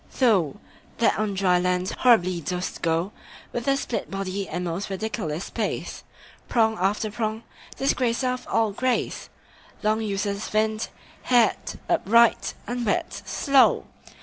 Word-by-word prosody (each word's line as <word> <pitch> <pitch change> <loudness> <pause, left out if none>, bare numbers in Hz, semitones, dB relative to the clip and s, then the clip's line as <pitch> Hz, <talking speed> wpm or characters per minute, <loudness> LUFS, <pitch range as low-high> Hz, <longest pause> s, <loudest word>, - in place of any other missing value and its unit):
Thou 200 - +3 0.4
that 230 - +2
on 210 -2 -1
dry 185 -2 +3
land 180 +1 0
horribly 185 -8 +3
dost 180 +3 -4
go 165 +4 0 0.4
With 240 +1 -3
a 275 0 +3
split 250 - -3
body 195 0 -3
and 175 +2 -3
most 175 +4 -3
ridiculous 195 -5 -3
pace, - - -3 0.5
Prong 220 -2 +3
after 205 +3 0
prong, 220 +1 -3 0.3
disgracer 255 -2 +1
of 250 0 -4
all 225 -2 +1
grace, 250 +5 -1 0.5
Long 215 +1 +2
useless 200 0 -2
finned, 215 +1 0 0.4
haired, 240 -4 +2
upright, 235 +3 +3
unwet, 240 -3 -1
slow! 275 -2 +4
215 Hz, 125 wpm, -25 LUFS, 185-235 Hz, 0.5 s, slow